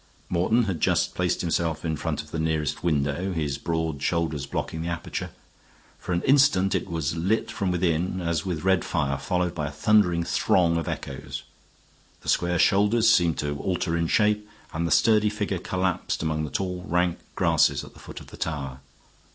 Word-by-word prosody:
Morton 95 +7 +2
had 95 -6 -3
just - - +2
placed - - 0
himself 85 -2 -1
in 80 -1 0
front 75 -1 -3
of 75 - -17
the 80 - -3
nearest 80 -2 -1
window, 80 +3 0
his 75 -4 -2
broad 80 -3 -2
shoulders 80 -4 -1
blocking 80 +3 -3
the 85 - -3
aperture. 85 0 -4 0.7
For - - -6
an 85 0 0
instant 135 -9 +4
it - - -1
was 80 -2 -2
lit 95 +7 0
from 95 - -2
within 90 0 0
as 85 -3 -1
with 90 -4 -3
red 95 -1 +3
fire, 70 -5 -1
followed 90 +4 -1
by 75 - -3
a - - -6
thundering 90 +1 +3
throng 85 0 +2
of 85 - -3
echoes. - - -5 0.8
The - - -6
square 90 0 +2
shoulders 105 +6 +4
seemed 85 -7 +3
to 75 -1 -2
alter 90 -1 -1
in 85 0 0
shape, 105 +2 +2 0.2
and 85 +1 -1
the - - -3
sturdy 110 -1 +4
figure 105 -3 -2
collapsed 90 -2 -1
among 80 -1 -1
the - - -6
tall, 90 +3 -3
rank 90 +1 +1 0.2
grasses - - +3
at - - -12
the - - -16
foot - - -9
of - - -14
the - - -11
tower. 70 -5 -4
85 Hz, 185 wpm, -25 LUFS, 80-95 Hz, 0.8 s, instant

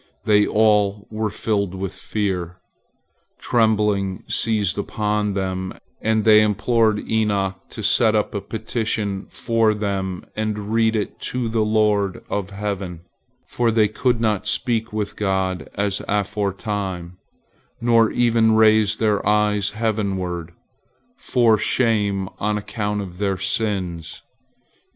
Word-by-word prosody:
They 105 -1 +4
all 105 -2 +2
were 110 0 -1
filled 100 -2 -1
with 95 0 -4
fear. 95 -3 -3 0.8
Trembling 105 -4 +1
seized 105 -4 0
upon 105 0 -1
them, 95 -1 -3 0.3
and 110 -1 +1
they 110 -1 +7
implored 110 +1 +1
Enoch 100 -4 0
to 110 - -8
set 110 +1 +4
up 105 - 0
a 100 - -2
petition 110 -3 -3
for 115 -2 +1
them 95 -3 -3
and 105 -1 -3
read 115 0 +3
it 105 - -3
to 125 -2 -2
the 110 -1 +1
Lord 105 -3 +1
of 100 -2 -2
heaven, 100 -4 -4 0.4
for 120 -1 0
they 110 -1 +3
could 120 +3 0
not 110 -4 0
speak 115 -3 0
with 105 -1 -3
God 95 -2 -1
as 100 -1 -1
aforetime, 100 -3 -2 0.6
nor 115 -1 +4
even 115 -2 +3
raise 110 -1 +4
their 105 -2 +1
eyes 105 -2 +2
heavenward, 95 -6 -2 0.6
for 115 -4 +2
shame 105 -5 +1
on 105 +1 0
account 105 0 -3
of 90 -1 -10
their 100 -2 0
sins. 95 -4 -3
105 Hz, 125 wpm, -21 LUFS, 95-110 Hz, 0.8 s, they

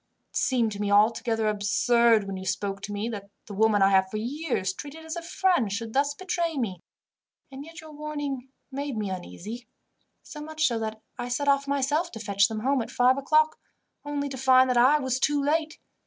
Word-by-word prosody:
It - - -21
seemed 240 -4 +1
to 205 0 -5
me 205 - -1
altogether 225 +2 +3
absurd, 215 +2 +3
when 195 -1 -5
you 190 - -6
spoke 195 +1 -2
to 205 - -6
me, 205 +2 -2
that 200 -3 -7 0.2
the 205 - -9
woman 210 0 +3
I 195 - +6
have 190 -1 +4
for 215 - -4
years 240 - -2
treated 295 +9 -9
as 320 +1 -5
a 340 - -4
friend 335 - +1
should 225 +2 -4
thus 285 +1 +1
betray 340 -2 -2
me. 200 -8 -2 0.7
And 270 +1 -8
yet 325 +1 -11
your 315 -1 -12
warning 290 -3 -5 0.2
made 275 -2 -4
me 205 -3 -2
uneasy, 210 +6 -7 0.6
so 300 - -9
much 310 0 -1
so 235 -4 +1
that 220 0 -4 0.2
I 245 - -3
set 285 +4 -1
off 280 0 +3
myself 280 +5 0
to 225 - -7
fetch 200 -1 +2
them 220 -1 -5
home 270 +2 +1
at - - -6
five 255 +2 +3
o'clock, 310 +2 +2 0.4
only 290 -1 -3
to 265 - -6
find 260 0 +5
that - - 0
I 260 +5 +6
was 260 -3 -1
too 290 +1 +2
late. 315 +3 0
250 Hz, 210 wpm, -26 LUFS, 215-290 Hz, 0.7 s, I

